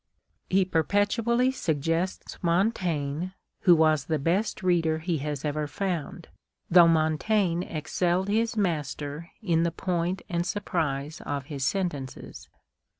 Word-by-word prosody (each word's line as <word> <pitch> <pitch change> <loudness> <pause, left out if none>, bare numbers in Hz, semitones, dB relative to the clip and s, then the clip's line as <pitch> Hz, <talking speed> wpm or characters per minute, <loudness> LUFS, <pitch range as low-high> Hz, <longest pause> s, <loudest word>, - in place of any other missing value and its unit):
He 190 0 +3
perpetually 205 - +2
suggests 165 - -2
jMontaigne, 170 -3 0 0.3
who 175 -3 +8
was 155 -3 +3
the 160 - 0
best 180 +8 0
reader 165 -3 +2
he 160 0 -2
has 145 0 -4
ever 150 0 -1
found, 175 -1 -4 0.4
though 175 -1 +8
Montaigne 165 +3 +2
excelled 175 +4 0
his 225 +2 0
master 155 -3 -2
in 165 -5 +2
the 170 - +2
point 175 +1 -2
and 170 -1 -1
surprise 155 -7 -2
of 140 -2 -3
his 140 -2 -3
sentences. 160 -9 -4
170 Hz, 120 wpm, -27 LUFS, 155-190 Hz, 0.4 s, who